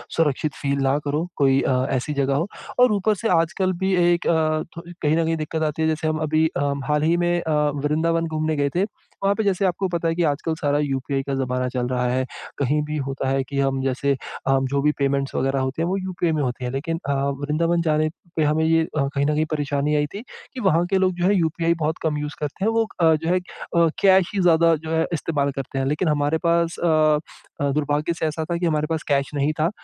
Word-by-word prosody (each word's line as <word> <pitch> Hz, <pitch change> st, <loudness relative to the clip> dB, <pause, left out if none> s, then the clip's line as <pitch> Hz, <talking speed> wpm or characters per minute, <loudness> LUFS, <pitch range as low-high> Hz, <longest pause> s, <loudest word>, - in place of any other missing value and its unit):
सुरक्षित 150 Hz, -2 st, +1 dB
फ़ील 140 Hz, 0 st, 0 dB
ना 135 Hz, +1 st, +2 dB
करो 150 Hz, +3 st, -1 dB
कोई 135 Hz, -2 st, +3 dB
अ, -, -, +1 dB, 0.2 s
ऐसी 130 Hz, +4 st, -2 dB
जगह 140 Hz, -1 st, +1 dB
हो 165 Hz, +6 st, 0 dB, 0.3 s
और 250 Hz, -1 st, +6 dB
ऊपर 210 Hz, +1 st, +1 dB
से 225 Hz, +3 st, -2 dB
आजकल 180 Hz, +2 st, +1 dB
भी 190 Hz, 0 st, +1 dB
एक 175 Hz, 0 st, +2 dB
अ, -, -, +4 dB, 0.5 s
थो -, -, -5 dB, 0.2 s
कहीं 155 Hz, +1 st, +2 dB
न 165 Hz, -, +2 dB
कहीं 165 Hz, 0 st, +1 dB
दिक्कत 155 Hz, +1 st, -3 dB
आती 155 Hz, 0 st, -1 dB
है। 160 Hz, -, +2 dB
जैसे 155 Hz, 0 st, -1 dB
हम 155 Hz, 0 st, 0 dB
अभी 155 Hz, +1 st, +2 dB
अ, -, -, -1 dB, 0.2 s
हाल 150 Hz, 0 st, +1 dB
ही 165 Hz, +2 st, +3 dB
में 175 Hz, 0 st, +1 dB
अ, 160 Hz, -2 st, -1 dB, 0.3 s
वृंदावन 165 Hz, +3 st, +1 dB
घूमने 155 Hz, 0 st, -1 dB
गए 145 Hz, -1 st, +1 dB
थे 180 Hz, -, +2 dB, 0.4 s
वहाँ 195 Hz, 0 st, +3 dB
पे 220 Hz, -, -1 dB
जैसे 195 Hz, -1 st, +1 dB
आपको 190 Hz, +1 st, 0 dB
पता 170 Hz, -2 st, -1 dB
है 165 Hz, -, 0 dB
कि 175 Hz, -, +1 dB
आजकल 155 Hz, +1 st, 0 dB
सारा 145 Hz, -1 st, +1 dB
यूपीआई 135 Hz, -1 st, -1 dB
का 140 Hz, -, -4 dB
ज़माना 125 Hz, -1 st, -1 dB
चल 125 Hz, -1 st, -1 dB
रहा 125 Hz, 0 st, -1 dB
है। 130 Hz, +1 st, 0 dB, 0.3 s
कहीं 145 Hz, +2 st, +1 dB
भी 150 Hz, +1 st, -4 dB
होता 135 Hz, 0 st, -3 dB
है 135 Hz, 0 st, +1 dB
कि 140 Hz, +1 st, -4 dB
हम 135 Hz, -1 st, +1 dB
जैसे 135 Hz, +1 st, +1 dB, 0.3 s
अ, 135 Hz, 0 st, +4 dB
जो 140 Hz, +1 st, 0 dB
भी 150 Hz, +1 st, +3 dB
पेमेंट्स 140 Hz, 0 st, 0 dB
वग़ैरह 135 Hz, +1 st, 0 dB
होते 130 Hz, +4 st, -2 dB
हैं 165 Hz, -, +1 dB
वो 190 Hz, -, 0 dB
यूपीआई 185 Hz, -3 st, -1 dB
में 155 Hz, -, 0 dB
होते 125 Hz, -1 st, -3 dB
हैं। 125 Hz, -, -2 dB
लेकिन 165 Hz, +5 st, -3 dB
अ, -, -, +2 dB, 0.3 s
वृंदावन 165 Hz, +4 st, +1 dB
जाने 155 Hz, -1 st, +1 dB, 0.3 s
पे 160 Hz, -, +2 dB
हमें 155 Hz, +1 st, +2 dB
ये 165 Hz, 0 st, +3 dB
कहीं 140 Hz, 0 st, 0 dB
न 150 Hz, -, +1 dB
कहीं 155 Hz, +1 st, +1 dB
परेशानी 145 Hz, 0 st, 0 dB
आई 145 Hz, 0 st, +2 dB
थी 200 Hz, -, -5 dB, 0.3 s
कि 260 Hz, -, -6 dB
वहाँ 175 Hz, -4 st, +3 dB
के 195 Hz, -, +2 dB
लोग 185 Hz, -1 st, +2 dB
जो -, -, +2 dB
है 205 Hz, -, +4 dB
यूपीआई 165 Hz, -1 st, +1 dB
बहुत 155 Hz, +1 st, 0 dB
कम 155 Hz, -2 st, 0 dB
यूज़ 150 Hz, +1 st, -4 dB
करते 150 Hz, +6 st, -3 dB
हैं। 225 Hz, -, +3 dB
वो 225 Hz, 0 st, +1 dB
अ, 160 Hz, -1 st, +6 dB
जो 160 Hz, +2 st, -3 dB
है 180 Hz, -, +3 dB
अ, 170 Hz, -2 st, -1 dB
कैश 190 Hz, -2 st, +5 dB
ही 200 Hz, -, 0 dB
ज़्यादा 165 Hz, -1 st, +5 dB
जो -, -, -3 dB
है 160 Hz, -, +2 dB
इस्तेमाल 145 Hz, -3 st, -1 dB
करते 135 Hz, 0 st, -4 dB
हैं। 135 Hz, -, 0 dB
लेकिन 150 Hz, +6 st, 0 dB
हमारे 150 Hz, +1 st, +1 dB
पास 170 Hz, 0 st, +2 dB
अ, 155 Hz, -2 st, +4 dB, 0.4 s
दुर्भाग्य 145 Hz, +3 st, 0 dB
से 165 Hz, -, -3 dB
ऐसा 155 Hz, +1 st, -2 dB
था 170 Hz, -, -2 dB
कि 175 Hz, -, -1 dB
हमारे 155 Hz, -2 st, +1 dB
पास 160 Hz, -1 st, -2 dB
कैश 140 Hz, -2 st, +1 dB
नहीं 145 Hz, +1 st, +1 dB
था 160 Hz, +2 st, +3 dB
155 Hz, 245 wpm, -23 LUFS, 140-170 Hz, 0.5 s, और